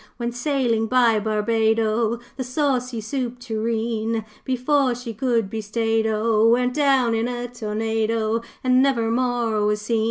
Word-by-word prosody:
'When 235 Hz, -1 st, -2 dB
sailin' 245 Hz, -3 st, 0 dB
by 235 Hz, -3 st, +3 dB
Barbado, 220 Hz, +1 st, +1 dB, 0.2 s
The 265 Hz, -, -3 dB
Saucy 255 Hz, -3 st, -1 dB
Soup 245 Hz, +2 st, -3 dB
Tureen, 225 Hz, -1 st, -2 dB, 0.2 s
Before 260 Hz, 0 st, +1 dB
she 240 Hz, -1 st, -7 dB
could 235 Hz, -2 st, 0 dB
be 220 Hz, +2 st, -4 dB
stayed 225 Hz, +1 st, 0 dB
O 220 Hz, 0 st, +2 dB
Went 250 Hz, +1 st, +2 dB
down 270 Hz, -5 st, +3 dB
in 225 Hz, +1 st, 0 dB
a 245 Hz, 0 st, -4 dB
tornado, 225 Hz, 0 st, -1 dB, 0.2 s
And 255 Hz, 0 st, +4 dB
never 235 Hz, -5 st, +2 dB
more 235 Hz, -3 st, 0 dB
was 210 Hz, 0 st, +1 dB
seen. 225 Hz, +1 st, 0 dB
230 Hz, 140 wpm, -22 LUFS, 220-250 Hz, 0.2 s, And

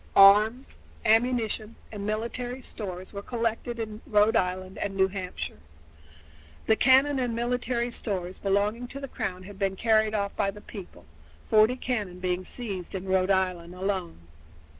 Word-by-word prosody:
Arms, 215 Hz, +6 st, +6 dB, 0.3 s
ammunition, 225 Hz, -1 st, +2 dB, 0.2 s
and 205 Hz, -2 st, -5 dB
military 235 Hz, +4 st, -3 dB
stores 185 Hz, -5 st, -7 dB
were 200 Hz, -, -5 dB
collected 235 Hz, +1 st, -2 dB
in 220 Hz, -1 st, -5 dB
Rhode 210 Hz, 0 st, +4 dB
Island 185 Hz, +1 st, -1 dB
and 195 Hz, -1 st, -2 dB
New 190 Hz, 0 st, +4 dB
Hampshire. 185 Hz, -, -5 dB, 1.1 s
The 220 Hz, -, +4 dB
cannon 270 Hz, +3 st, +5 dB
and 245 Hz, -3 st, -1 dB
military 240 Hz, 0 st, -1 dB
stores 185 Hz, -5 st, -3 dB
belonging 205 Hz, +5 st, 0 dB
to 275 Hz, -, -7 dB
the 275 Hz, -, -5 dB
Crown 195 Hz, -8 st, -4 dB
had 200 Hz, +1 st, -11 dB
been 195 Hz, -1 st, 0 dB
carried 220 Hz, 0 st, +3 dB
off 200 Hz, -1 st, -1 dB
by 195 Hz, -, +1 dB
the 200 Hz, +1 st, -7 dB
people, 190 Hz, -, -11 dB, 0.5 s
forty 220 Hz, +3 st, +6 dB
cannon 215 Hz, -8 st, -3 dB
being 180 Hz, 0 st, -1 dB
seized 195 Hz, -4 st, -5 dB
in 190 Hz, 0 st, -4 dB
Rhode 190 Hz, 0 st, +2 dB
Island 180 Hz, -2 st, 0 dB
alone. 185 Hz, -, -3 dB
210 Hz, 150 wpm, -27 LUFS, 190-235 Hz, 1.1 s, Arms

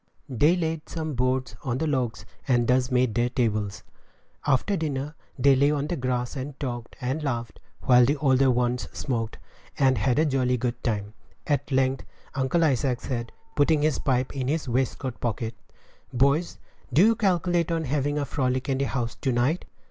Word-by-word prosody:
They 145 Hz, +7 st, +3 dB
laid 160 Hz, -3 st, -3 dB
some 160 Hz, -2 st, -3 dB
boards 130 Hz, +1 st, 0 dB
on 125 Hz, -3 st, -1 dB
logs, 130 Hz, -8 st, -1 dB, 0.2 s
and 120 Hz, -3 st, +3 dB
thus 125 Hz, 0 st, +3 dB
made 125 Hz, -3 st, +2 dB
their 120 Hz, +1 st, +1 dB
tables. 110 Hz, -5 st, -1 dB, 0.6 s
After 145 Hz, +9 st, +2 dB
dinner, 150 Hz, -3 st, -2 dB, 0.2 s
they 140 Hz, +1 st, +5 dB
lay 140 Hz, +2 st, +4 dB
on 145 Hz, -1 st, 0 dB
the 175 Hz, -, -2 dB
grass 125 Hz, -3 st, -2 dB
and 135 Hz, +1 st, -6 dB
talked 120 Hz, -4 st, -5 dB
and 130 Hz, +4 st, -2 dB
laughed, 120 Hz, -5 st, -3 dB, 0.2 s
while 125 Hz, -1 st, +6 dB
the 140 Hz, +5 st, +2 dB
older 135 Hz, -2 st, +3 dB
ones 125 Hz, 0 st, 0 dB
smoked, 115 Hz, -4 st, -3 dB, 0.4 s
and 130 Hz, -4 st, +3 dB
had 125 Hz, +4 st, +1 dB
a 155 Hz, -, +4 dB
jolly 130 Hz, -3 st, +1 dB
good 120 Hz, 0 st, -3 dB
time. 105 Hz, -3 st, -2 dB, 0.3 s
At 145 Hz, -1 st, -1 dB
length 130 Hz, 0 st, +1 dB, 0.3 s
Uncle 135 Hz, +5 st, +1 dB
Isaac 135 Hz, -4 st, +1 dB
said, 120 Hz, -3 st, -4 dB, 0.2 s
putting 150 Hz, +1 st, +3 dB
his 155 Hz, -2 st, +2 dB
pipe 130 Hz, -2 st, 0 dB
in 130 Hz, -2 st, -2 dB
his 155 Hz, +1 st, -1 dB
waistcoat 130 Hz, 0 st, -1 dB
pocket, 115 Hz, -1 st, -2 dB, 0.6 s
"Boys, 140 Hz, +7 st, +2 dB, 0.3 s
do 160 Hz, +10 st, +6 dB
you 225 Hz, +1 st, +4 dB
calculate 175 Hz, -5 st, +1 dB
on 165 Hz, -1 st, 0 dB
having 145 Hz, +1 st, 0 dB
a 145 Hz, -, 0 dB
frolic 130 Hz, -2 st, -1 dB
in 135 Hz, 0 st, +1 dB
the 140 Hz, -, +1 dB
house 120 Hz, -3 st, -2 dB
to 135 Hz, -, -1 dB
night?" 125 Hz, +8 st, +1 dB
130 Hz, 175 wpm, -26 LUFS, 125-145 Hz, 0.6 s, while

